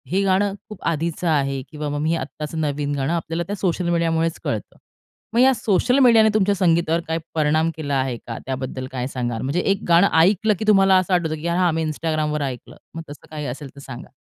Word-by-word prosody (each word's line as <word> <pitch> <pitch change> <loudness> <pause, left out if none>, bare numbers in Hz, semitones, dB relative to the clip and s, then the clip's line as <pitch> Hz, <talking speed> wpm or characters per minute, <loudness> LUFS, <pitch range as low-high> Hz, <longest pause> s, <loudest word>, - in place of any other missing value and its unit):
हे 195 - +2
गाणं 195 +1 +2 0.2
खूप 210 - -10
आधीचं 170 +1 -1
आहे 140 -3 0
किंवा 150 -1 -5
मग 145 0 -3
मी 155 - 0
हे - - +2
आत्ताचं 155 0 -6
नवीन 145 -1 -1
गाणं 140 +4 -1
आपल्याला 165 0 -2
त्या 205 - -3
सोशल 180 -2 -1
मीडियामुळेच 165 -1 0
कळतं. - - -4 0.6
मग 235 - +2
या 265 +1 +6
सोशल 245 +3 +1
मीडियाने 230 -4 +6
तुमच्या 205 -1 +2
संगीतावर 170 -3 +2
काही 160 0 -1 0.2
परिणाम 155 +1 +2
केला 145 -2 -3
आहे 130 -2 -2
का? 115 - -5
त्याबद्दल 130 0 -4
काय 125 -1 -3
सांगाल? 120 -4 -3
म्हणजे 140 +7 -1
एक 195 0 0
गाणं 175 +3 +5
ऐकलं 210 +5 +4
की 220 - -3
तुम्हाला 195 -2 +5
असं 185 0 0
आठवतं 165 -3 +1
की 160 +2 -5
“हां, 175 0 +2
मी 160 0 -1
Instagramवर 155 -1 -2
ऐकलं” 125 -2 -10 0.2
मग 165 - -4
तसं 145 - -12
काही 150 -1 -6
असेल 135 +2 -6
तर - - -12
सांगा? 130 -3 -10
165 Hz, 210 wpm, -22 LUFS, 145-185 Hz, 0.6 s, या